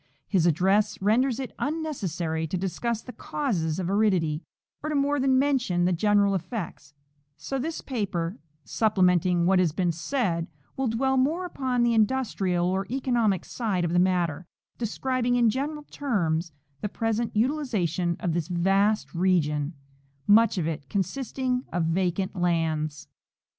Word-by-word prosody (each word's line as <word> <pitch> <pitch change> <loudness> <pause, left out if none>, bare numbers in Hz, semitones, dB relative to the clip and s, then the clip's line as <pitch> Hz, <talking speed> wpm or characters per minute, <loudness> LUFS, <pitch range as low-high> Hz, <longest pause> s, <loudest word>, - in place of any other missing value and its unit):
His 180 -4 +2
address 195 +6 +2
renders 235 +6 +2
it 265 - -5
unnecessary 185 - -2
to 185 - -2
discuss 215 +5 -2
the 250 - -8
causes 175 - -2
of 185 -2 -2
aridity, 185 -6 +1 0.4
or 305 - -3
to 305 - -1
more 285 +1 +2
than 265 0 +3
mention 255 -11 +2
the 180 - +2
general 200 +2 +3
effects; 175 - -5 0.4
so 270 - -4
this 315 +5 -3
paper, 195 -7 -3 0.2
supplementing 180 -5 +2
what 185 +1 +4
has 175 -4 +3
been 175 +2 0
said, 170 - -1 0.3
will 265 -1 -1
dwell 265 +4 +1
more 315 +8 +1
upon 260 -7 -1
the 240 -1 +3
industrial 210 -6 +1
or 190 +2 0
economic 235 -7 +1
side 200 -7 -1
of 170 - -1
the 175 - +4
matter, 175 -3 +1 0.3
describing 245 +2 0
in 235 -2 +4
general 295 +5 -3
terms 175 - -1 0.3
the 210 - -2
present 225 +2 -1
utilization 210 - 0
of 170 - 0
this 165 -2 -1
vast 195 +4 +1
region, 165 -4 +1 0.5
much 215 0 +5
of 170 - 0
it 150 -4 -5
consisting 250 +5 -1
of 175 0 0
vacant 180 +3 0
lands. 160 -4 -1
195 Hz, 145 wpm, -26 LUFS, 175-250 Hz, 0.5 s, much